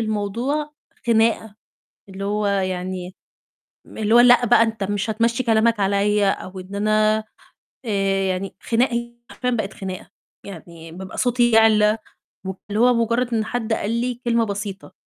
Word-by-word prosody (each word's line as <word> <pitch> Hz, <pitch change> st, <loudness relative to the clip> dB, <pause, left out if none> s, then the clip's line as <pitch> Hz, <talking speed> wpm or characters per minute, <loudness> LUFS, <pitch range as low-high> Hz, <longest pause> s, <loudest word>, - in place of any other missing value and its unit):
الموضوع 230 Hz, +8 st, -2 dB, 0.3 s
خناقة، 225 Hz, -2 st, +2 dB, 0.5 s
اللي 195 Hz, +1 st, -7 dB
هو 210 Hz, +1 st, -1 dB
يعني 185 Hz, -1 st, -2 dB, 0.7 s
م -, -, -14 dB
اللي 220 Hz, +1 st, +2 dB
هو -, -, +8 dB
لأ 245 Hz, 0 st, +6 dB
بقى 225 Hz, -, +5 dB
أنت 220 Hz, -3 st, -3 dB
مش 205 Hz, +2 st, -2 dB
هتمشّي 230 Hz, +3 st, 0 dB
كلامك 225 Hz, -1 st, +2 dB
عليَّ 200 Hz, +1 st, +2 dB
أو 190 Hz, 0 st, -4 dB
إن 185 Hz, +2 st, -9 dB
أنا 215 Hz, +1 st, +2 dB, 0.6 s
آآ، 220 Hz, -, -3 dB, 0.4 s
يعني 185 Hz, +1 st, -3 dB
خناق 240 Hz, +3 st, +1 dB, 0.4 s
حرفيًا 250 Hz, -, -3 dB
بقت 215 Hz, -4 st, -2 dB
خناقة، 190 Hz, -2 st, -7 dB, 0.4 s
يعني 165 Hz, -3 st, -11 dB
بابقى 185 Hz, +3 st, -9 dB
صوتي 240 Hz, -1 st, +2 dB
يعلى، 220 Hz, -1 st, +5 dB, 0.5 s
واللي 195 Hz, +3 st, -5 dB
هو 250 Hz, +1 st, +5 dB
مجرد 235 Hz, +1 st, 0 dB
إن 220 Hz, -1 st, 0 dB
حد 225 Hz, -1 st, -2 dB
قال 210 Hz, -1 st, -2 dB
لي 240 Hz, +1 st, -2 dB
كلمة 235 Hz, -1 st, +2 dB
بسيطة. 200 Hz, -1 st, -6 dB
215 Hz, 145 wpm, -21 LUFS, 195-230 Hz, 0.7 s, هو